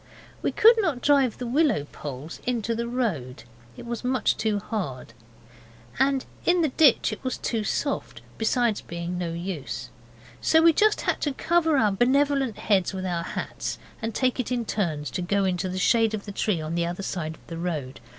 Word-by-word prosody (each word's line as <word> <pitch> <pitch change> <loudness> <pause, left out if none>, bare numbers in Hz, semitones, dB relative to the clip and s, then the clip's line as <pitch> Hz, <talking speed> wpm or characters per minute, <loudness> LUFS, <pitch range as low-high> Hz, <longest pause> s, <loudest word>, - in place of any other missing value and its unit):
We - - 0
could 460 +2 +6
not 315 -11 -1
drive 275 -5 +3
the 250 - -5
willow 270 - +2
poles 145 +2 -7
into 235 -2 0
the 235 +1 -2
road; 190 - -2 0.3
it - - -9
was 235 0 -4
much 250 -3 +1
too 215 -2 0
hard. 180 - -4 0.9
And 270 0 +2 0.2
in 350 0 +3
the 310 - +2
ditch 265 -5 +4
it - - -9
was 255 -1 -2
too 225 -2 -2
soft, 280 +7 -2 0.2
besides 225 -1 +1
being 170 +1 -5
no 170 -2 -2
use. 160 -9 -5 0.5
So 320 - +4
we 335 - +8
had - - -12
just 430 0 +3
to 290 - -1
cover 325 +1 +2
our 215 -5 +3
benevolent 265 +2 +2
heads 195 -3 +1
with 190 0 -4
our 175 -2 -1
hats, - - -4 0.2
and 225 0 -3
take 255 -1 +1
it 255 - -2
in 240 -2 0
turns 155 - -2
to 180 - -3
go 195 +2 +1
into 185 0 -1
the 185 - -4
shadow 225 +2 +3
of 200 - -11
the 205 - -6
tree 200 -2 0
on 155 +1 -4
the 170 0 0
other 175 +3 -4
side 160 -5 -3
of - - -23
the 165 -1 -7
road. 150 -7 -3
215 Hz, 195 wpm, -26 LUFS, 175-255 Hz, 0.9 s, we